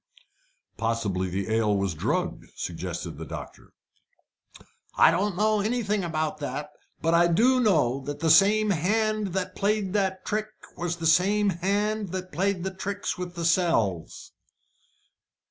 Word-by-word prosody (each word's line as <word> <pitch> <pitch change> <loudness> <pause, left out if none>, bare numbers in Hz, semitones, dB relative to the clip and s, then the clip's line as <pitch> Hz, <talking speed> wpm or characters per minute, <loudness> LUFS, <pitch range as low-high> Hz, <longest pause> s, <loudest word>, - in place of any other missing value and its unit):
"Possibly 110 -5 -1
the 100 +4 -2
ale 110 -2 +2
was 100 -2 -1
drugged," 75 - -2
suggested - - -5
the - - -6
doctor. - - -9 1.3
"I - - +7
don't 195 +1 0
know 215 0 +2
nothing 210 -2 0
about 155 -2 -2
that, 150 0 -5 0.3
but 165 +1 +2
I 170 +1 +5
do 240 +10 +3
know 155 - +2
that 145 0 -5
the 160 0 +2
same 205 +5 +5
hand 215 +4 +1
that 190 -1 -2
played 200 -2 0
that 190 -2 -1
trick 215 +1 -1 0.3
was 175 0 -2
the 165 - -5
same 195 +6 +3
hand 205 +3 -1
that 185 0 -5
played 185 +2 -1
the 190 0 -3
tricks 200 0 -4
with 180 -1 -5
the 170 -1 -3
cells." 165 - 0
180 Hz, 145 wpm, -26 LUFS, 155-205 Hz, 1.3 s, I